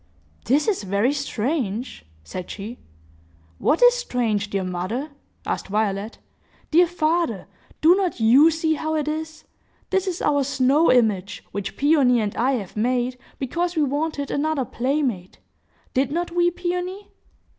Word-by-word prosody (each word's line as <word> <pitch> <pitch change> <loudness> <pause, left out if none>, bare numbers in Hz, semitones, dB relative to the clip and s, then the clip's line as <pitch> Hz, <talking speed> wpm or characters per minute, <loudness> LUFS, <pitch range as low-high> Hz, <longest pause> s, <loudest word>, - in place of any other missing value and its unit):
"This 290 +4 +2
is 415 -4 +1
very 200 +7 +1
strange!" 250 - -3 0.2
said 180 - -7
she. 215 +4 -7 0.8
"What 320 - +2
is - - +8
strange, 235 - -1
dear 195 -2 -1
mother?" 185 - -3 0.3
asked - - -3
Violet. 205 +1 -1 0.5
"Dear 345 +3 +5
father, 325 - 0 0.4
do 325 +3 +7
not 370 -7 -1
you 255 +8 +6
see 320 0 0
how 315 +1 -2
it 300 -1 -1
is? 315 +1 -4 0.5
This 385 0 +1
is 360 -2 -2
our 285 -1 +2
snow 275 +4 +3
image, 210 -6 +1
which 200 -1 -5
Peony 275 -4 +4
and 210 -2 -2
I 260 +3 +1
have 205 -8 -4
made, 250 +3 0 0.2
because 345 +7 -2
we 310 - +2
wanted 285 0 -2
another 290 -2 0
playmate. 250 -9 -2 0.6
Did 265 +1 +1
not 345 +2 -2
we, 350 0 +3
Peony?" 360 +3 -4
275 Hz, 145 wpm, -23 LUFS, 220-320 Hz, 0.8 s, is